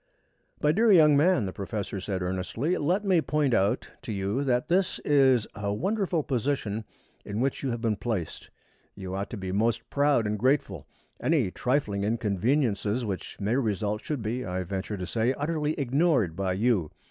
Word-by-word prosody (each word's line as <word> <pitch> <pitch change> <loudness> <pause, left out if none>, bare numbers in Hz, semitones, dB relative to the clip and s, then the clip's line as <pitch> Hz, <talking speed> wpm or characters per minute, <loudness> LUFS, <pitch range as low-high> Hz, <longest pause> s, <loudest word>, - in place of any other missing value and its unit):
"My 150 - +5
dear 220 +6 +4
young 155 -6 +7
man," 155 - +3
the 95 - -4
professor 100 0 -4
said 95 -1 -3
earnestly, 95 - -1
"let 180 +8 0
me 185 -4 +4
point 150 -4 +1
out 100 -1 +1
to - - -6
you 100 +6 -1
that 125 -2 +1
this 185 +1 +1
is 130 -6 +4
a 100 -2 -3
wonderful 185 - 0
position 120 -5 -2 0.4
in 105 +1 -4
which 135 +2 0
you 135 - -2
have 120 -1 -3
been 110 -3 0
placed. 95 -5 -4 0.5
You 95 -2 -6
ought 100 +2 -3
to 115 - -6
be 95 -2 -4
most 110 +4 0
proud 140 -5 +3
and 105 0 -1
grateful. 125 - 0 0.3
Any 140 - +2
trifling 115 -6 0
inconveniences 110 - 0
which 95 -3 -5
may 105 +4 0
result 105 -4 -1
should 145 -7 -3
be, 120 +4 -2
I 90 -3 -3
venture 95 +3 -4
to 90 - -4
say, 115 +6 0
utterly 150 +1 -1
ignored 135 - +2
by 95 0 -1
you. 100 -5 +1
115 Hz, 175 wpm, -27 LUFS, 100-145 Hz, 0.5 s, young